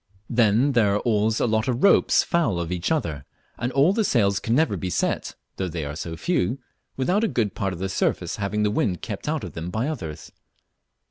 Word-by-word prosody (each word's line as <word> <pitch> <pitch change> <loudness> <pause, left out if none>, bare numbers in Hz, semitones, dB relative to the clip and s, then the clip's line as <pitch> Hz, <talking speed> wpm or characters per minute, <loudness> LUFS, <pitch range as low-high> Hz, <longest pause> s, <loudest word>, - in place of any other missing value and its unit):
Then 115 +3 +3
there 110 -6 +3
are - - +1
always 110 -1 +1
a - - +2
lot 110 +1 +1
of 125 -1 -1
ropes 200 - +5
foul 150 - +1
of 85 0 -3
each 90 - -2
other, 80 - -1 0.4
and 120 +2 -1
all 140 +8 +4
the 220 +1 +1
sails 100 - +2
can 115 - 0
never 160 +4 +2
be 95 - -3
set - - -1 0.2
(though 95 - -1
they 80 -3 -4
are 70 +1 -5
so 80 +1 -5
few) 130 - 0 0.4
without 180 - +1
a - - +3
good 110 - -1
part 100 -2 -2
of 90 - -6
their 95 +2 -2
surface 95 - -1
having 105 +1 -1
the 105 - +2
wind 90 -4 -1
kept - - -5
out - - -1
of - - -7
them 80 +1 -5
by 110 +8 -1
others. 90 - -6
110 Hz, 220 wpm, -24 LUFS, 90-130 Hz, 0.4 s, ropes